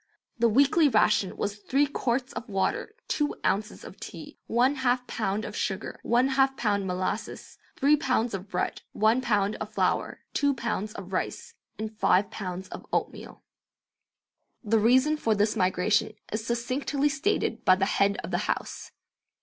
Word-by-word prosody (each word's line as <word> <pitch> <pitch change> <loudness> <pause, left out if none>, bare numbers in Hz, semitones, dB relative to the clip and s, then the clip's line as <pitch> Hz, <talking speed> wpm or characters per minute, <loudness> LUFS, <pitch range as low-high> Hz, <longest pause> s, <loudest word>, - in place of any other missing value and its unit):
The 235 0 +4
weekly 285 +6 +4
ration 210 -4 +2
was 205 0 -2
three 270 +7 +1
quarts 255 -2 -2
of 245 - -6
water, 200 - -1
two 295 -1 0
ounces 210 +3 -1
of - - -11
tea, - - -9
one 255 +5 +2
half 250 -1 +1
pound 215 -2 -2
of 210 - -7
sugar, 195 +2 -3
one 245 +3 +2
half 270 0 +2
pound 200 -4 0
molasses, 185 +4 -4 0.2
three 285 +2 +4
pounds 255 -6 0
of 195 0 -5
bread, - - -2
one 220 +4 +3
pound 210 -4 +1
of 215 0 -6
flour, - - 0
two 285 -1 +2
pounds 215 -3 -3
of 190 -1 -9
rice, 460 - -3 0.2
and 220 0 -5
five 195 +2 +3
pounds 185 -2 -5
of - - -8
oatmeal. - - -3 1.2
The 225 0 +2
reason 260 +7 +4
for 225 -7 +1
this 210 +2 +1
migration 185 +2 +1 0.2
is 215 +1 -3
succinctly 255 +4 0
stated 315 +8 -1
by 185 - +6
the 190 +1 +1
head 200 0 +2
of - - -6
the - - +1
house. - - -3
225 Hz, 160 wpm, -27 LUFS, 205-265 Hz, 1.2 s, by